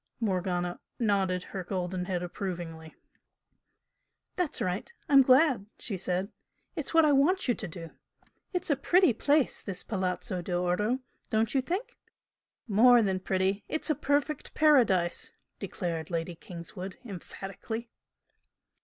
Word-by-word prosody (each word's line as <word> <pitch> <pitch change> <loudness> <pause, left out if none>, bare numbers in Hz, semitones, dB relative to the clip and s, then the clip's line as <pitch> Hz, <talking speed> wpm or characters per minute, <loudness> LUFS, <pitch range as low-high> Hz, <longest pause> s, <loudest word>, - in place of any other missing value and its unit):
Morgana 180 -4 -1 0.2
nodded 195 -5 +1
her 190 - -6
golden 180 0 -3
head 180 -2 -2
approvingly. 170 -3 -6 1.4
"That's 360 -5 -1
right! 185 - -2 0.2
I'm 275 -1 +7
glad!" 260 -5 +4
she 210 - -3
said. 185 +2 -2 0.4
"That's - - -4
what 325 -1 +6
I 300 - +4
want 295 +7 +3
you 245 - +4
to 215 - -5
do! 165 0 -8 0.6
It's 360 -3 -1
a - - +4
pretty 350 +1 +4
place, 285 +4 +2
this 195 -3 -5
Palazzo 185 -1 -2
d'Oro, 180 +8 0 0.3
don't 220 0 +1
you 270 - +3
think?" 365 - -4 0.7
"More 235 +3 +6
than 190 -2 0
pretty 190 +2 0
it's 315 0 0
a - - +4
perfect 285 +2 -1
paradise!" 235 - +3 0.3
declared 165 -5 -4
Lady 170 0 -2
Kingswood, 175 +2 -8
emphatically. 210 +3 -7
195 Hz, 125 wpm, -29 LUFS, 180-260 Hz, 1.4 s, I'm